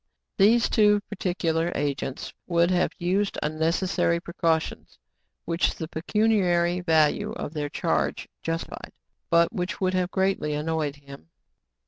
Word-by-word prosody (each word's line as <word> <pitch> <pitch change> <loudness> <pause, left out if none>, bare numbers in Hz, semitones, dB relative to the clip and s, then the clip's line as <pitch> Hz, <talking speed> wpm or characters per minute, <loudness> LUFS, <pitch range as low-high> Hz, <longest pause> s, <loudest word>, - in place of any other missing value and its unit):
These 225 +4 +5
too 210 -2 +4
particular 175 -4 -1
agents 140 -2 -3
would 170 0 +2
have 180 -1 +2
used 190 +3 0
unnecessary 165 +2 0
precautions, 165 -2 -2 0.5
which 170 +1 0
the 160 - -5
pecuniary 180 -1 +1
value 160 -4 +2
of 145 - -6
their 150 -2 -3
charge - - -1
justified, 165 0 -5 0.4
but 170 +5 +3
which 180 -2 -3
would 185 -2 +1
have 180 -1 0
greatly 190 -6 0
annoyed 150 -1 -2
him. 140 - -14
170 Hz, 120 wpm, -25 LUFS, 160-185 Hz, 0.5 s, These